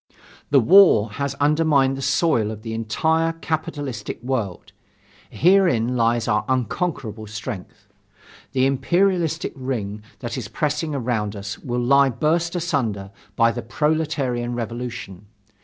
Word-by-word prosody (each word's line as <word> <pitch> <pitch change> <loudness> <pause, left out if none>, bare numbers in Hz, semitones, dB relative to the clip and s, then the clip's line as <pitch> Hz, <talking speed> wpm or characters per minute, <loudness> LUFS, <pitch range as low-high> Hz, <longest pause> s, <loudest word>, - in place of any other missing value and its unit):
The 140 - +5
war 125 - +6
has 140 +5 -3
undermined 145 -2 +2
the 135 - -6
soil 130 -4 +2
of 110 -1 -7
the 115 -1 -5
entire 160 +9 0
capitalistic 155 -6 -4
world. 115 -8 -3 0.6
Herein 170 - +3
lies 115 -1 +1
our 105 -2 +1
unconquerable 125 - -2
strength. 110 -2 -7 0.7
The 130 0 +3
imperialistic 170 +5 +1
ring 115 -6 -4 0.2
that 120 +1 -5
is 110 - -6
pressing 150 - -2
around 115 -5 -2
us 100 +2 -6
will 125 -1 -3
lie 140 +2 +5
burst 165 +7 0
asunder 120 - -2 0.2
by 115 +1 +4
the 120 - -5
proletarian 135 -3 -1
revolution. 120 -4 -6
130 Hz, 125 wpm, -22 LUFS, 115-155 Hz, 0.7 s, war